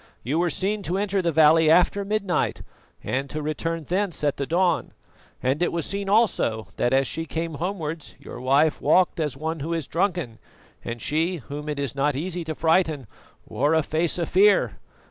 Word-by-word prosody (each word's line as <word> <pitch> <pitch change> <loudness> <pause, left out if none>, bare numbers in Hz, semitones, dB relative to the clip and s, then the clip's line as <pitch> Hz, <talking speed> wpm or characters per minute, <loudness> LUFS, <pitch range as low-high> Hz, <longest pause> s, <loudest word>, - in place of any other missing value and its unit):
You 145 +8 0
were 175 0 +2
seen 200 +6 -1
to 185 0 -2
enter 200 -1 0
the 170 -2 0
valley 160 +1 +5
after 180 +4 +4
midnight 200 -2 -1 0.4
and 135 +2 -2
to 155 - -4
return 160 +2 -3
thence 185 +1 -2
at 145 -2 +1
the 140 - -3
dawn, 175 0 +1 0.5
and 135 +5 0
it 175 - +2
was 170 -2 -2
seen 200 0 -3
also 115 - +1
that 120 - +1
as 135 +1 +3
she 165 +3 -3
came 165 0 -3
homewards 165 -4 -4
your - - -10
wife 140 +4 +2
walked 185 -2 +3
as 150 -4 -2
one 160 +2 -3
who 165 +4 -2
is 165 -4 -3
drunken, 170 - -1 0.4
and 115 -1 -5
she, 165 +4 0
whom 150 0 -7
it 150 - -3
is 140 -4 -2
not 140 0 0
easy 175 +4 -3
to 160 -1 -4
frighten, 160 -4 +1 0.4
wore 150 +3 +1
a 160 - +3
face 160 +3 0
of 170 - -1
fear. 190 - +3
160 Hz, 190 wpm, -24 LUFS, 145-180 Hz, 0.5 s, valley